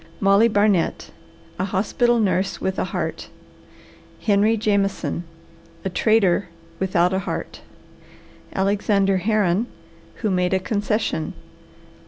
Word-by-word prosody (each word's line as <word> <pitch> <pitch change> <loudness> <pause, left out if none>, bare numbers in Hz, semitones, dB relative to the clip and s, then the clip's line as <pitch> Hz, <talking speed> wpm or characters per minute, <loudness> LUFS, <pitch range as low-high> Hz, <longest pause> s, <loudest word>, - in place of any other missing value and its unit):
MOLLY 200 +3 +5
BARNET, 205 -5 +1 0.5
A 185 - +1
Hospital 230 +5 +1
Nurse 195 -2 0
with 190 0 -2
a - - 0
Heart. - - -4 0.9
HENRY 215 +2 +3
JAMESON, 200 -4 0 0.6
A - - 0
Trader 200 -3 +2 0.3
Without 180 -1 +2
a 190 - +1
Heart. 195 - -5 0.9
ALEXANDER 195 0 +2
HERRON, 205 +1 +1 0.5
Who 215 -3 -2
Made 180 0 +1
a - - +2
Concession. 205 -4 -1
200 Hz, 105 wpm, -22 LUFS, 190-215 Hz, 0.9 s, MOLLY